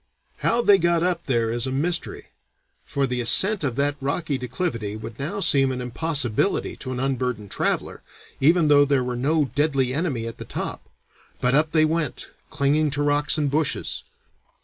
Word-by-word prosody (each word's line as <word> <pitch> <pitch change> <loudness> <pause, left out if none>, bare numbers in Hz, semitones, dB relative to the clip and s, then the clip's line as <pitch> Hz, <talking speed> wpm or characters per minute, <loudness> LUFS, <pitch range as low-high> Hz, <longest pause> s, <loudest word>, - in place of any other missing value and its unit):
How 235 +1 +1
they 200 -3 +6
got 170 -1 +2
up 175 -1 -1
there 115 -4 +1
is 120 +2 -1
a - - -3
mystery, 165 +6 -2 0.5
for 140 -1 -1
the 125 -1 -2
ascent 190 - +5
of 130 -5 -1
that 145 +1 0
rocky 145 +2 -2
declivity 125 - -3
would 110 +1 -9
now 175 +9 -4
seem 135 -6 +4
an 130 - -4
impossibility 125 - -1
to 130 - -7
an 125 - -4
unburdened 125 -6 -2
traveller, - - -1 0.4
even 160 +3 +4
though 145 -1 +6
there 140 -2 +1
were 125 0 -3
no 145 +1 0
deadly 140 -4 +1
enemy 140 -7 -2
at 115 - -7
the - - -5
top. - - -6 0.5
But 125 0 +1
up 155 +3 +3
they 155 -1 +4
went, 160 -1 -3 0.2
clinging 150 +2 +1
to 145 - 0
rocks 145 +1 +2
and 145 -3 0
bushes. 155 0 -1
140 Hz, 175 wpm, -23 LUFS, 125-160 Hz, 0.5 s, they